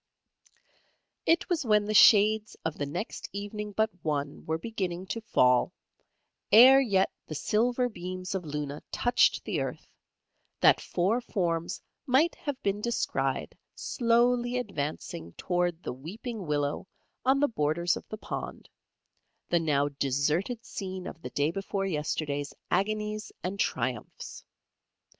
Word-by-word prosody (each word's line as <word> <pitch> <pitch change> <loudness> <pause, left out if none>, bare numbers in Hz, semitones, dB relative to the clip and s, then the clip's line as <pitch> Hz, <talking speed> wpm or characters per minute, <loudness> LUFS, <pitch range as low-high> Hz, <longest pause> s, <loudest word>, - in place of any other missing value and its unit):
"] - - -41
It 330 +1 +3
was 345 -4 0
when 210 -3 +3
the 215 - -2
shades 215 +1 +6
of 160 -1 -1
the 145 - -1
next 180 +9 -5
evening 205 +1 -5
but 220 +2 +1
one 145 -2 -2
were 160 0 0
beginning 185 -2 -4
to 230 - -5
fall, 125 - +3 0.8
'ere 255 +5 +9
yet 195 -7 +2 0.2
the 155 - -5
silver 245 - +1
beams 185 -3 -6
of 190 -2 -2
Luna 150 -1 -4
touched 245 0 +3
the - - -2
earth, - - -6 0.7
that - - +5
four 195 +8 0
forms 170 -7 -2 0.2
might 280 +7 +4
have 285 -3 -5
been 200 +1 0
descried 235 +1 -1 0.2
slowly 240 0 +2
advancing 145 - -4
towards 175 -2 -1
the - - -3
weeping 200 - -7
willow 145 +3 -1 0.4
on 265 +2 +3
the 290 - +4
borders 170 - 0
of - - -9
the 215 - -5
pond, - - -6 0.8
the 170 - +3
now 145 -3 +2
deserted 145 - -1
scene 185 -2 -6
of 165 - -8
the 125 - -6
day 145 +4 0
before 195 +1 -3
yesterday's 150 -4 -2 0.2
agonies 210 +2 -1
and 190 +2 -3
triumphs. 125 - -3
190 Hz, 135 wpm, -29 LUFS, 155-225 Hz, 0.8 s, ere